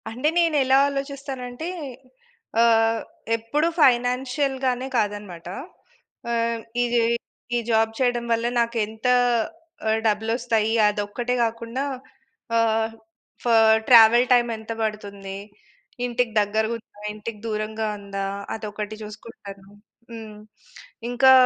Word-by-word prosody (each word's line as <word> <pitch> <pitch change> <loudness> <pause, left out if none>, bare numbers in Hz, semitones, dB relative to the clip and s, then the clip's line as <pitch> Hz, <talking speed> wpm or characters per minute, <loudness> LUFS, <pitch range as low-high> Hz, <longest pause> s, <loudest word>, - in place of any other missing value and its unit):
అంటే 250 +6 -1
నేనెలా 290 -6 +4
ఆలోచిస్తానంటే, 275 -1 -5 0.9
ఆహ్, 225 -1 +4 0.4
ఎప్పుడూ 285 +8 0
ఫైనాన్షియల్‌గానే 260 0 +2
కాదనమాట. 205 -6 -3 0.8
ఆహ్, 230 0 0 0.2
ఇదా 240 -1 +2
ఈ - - -1 0.4
ఈ - - +2
జాబ్ 225 -1 +3
చేయడం 245 -2 +1
వల్ల, 230 0 +1
నాకేంత 225 0 -1 0.8
ఆహ్, 220 0 +2
డబ్బు‌లోస్తాయి, 225 +1 +1
అదొక్కటే 210 +4 -2
గాకుండా, 230 +3 -2 0.7
ఆహ్, 225 0 +2 0.5
ఫా 240 - +2 0.4
ట్రావెల్ 235 +1 +8
టైమ్ 240 -1 +4
ఎంత 220 +1 -8
బడుతుంది, 200 -2 -5 0.7
ఇంటికి 245 -1 -1
దగ్గరగుందా, 220 +1 -2
ఇంటికి 215 0 -7
దూరంగా 215 0 -2
ఉందా, 200 -1 -4 0.3
అదొకటి 215 -1 -5
జూసుకుంటాను. 205 -2 -11 0.4
హ్మ్. 220 -2 -9 0.7
ఇంకా 255 +2 +5
230 Hz, 95 wpm, -24 LUFS, 215-245 Hz, 0.9 s, ట్రావెల్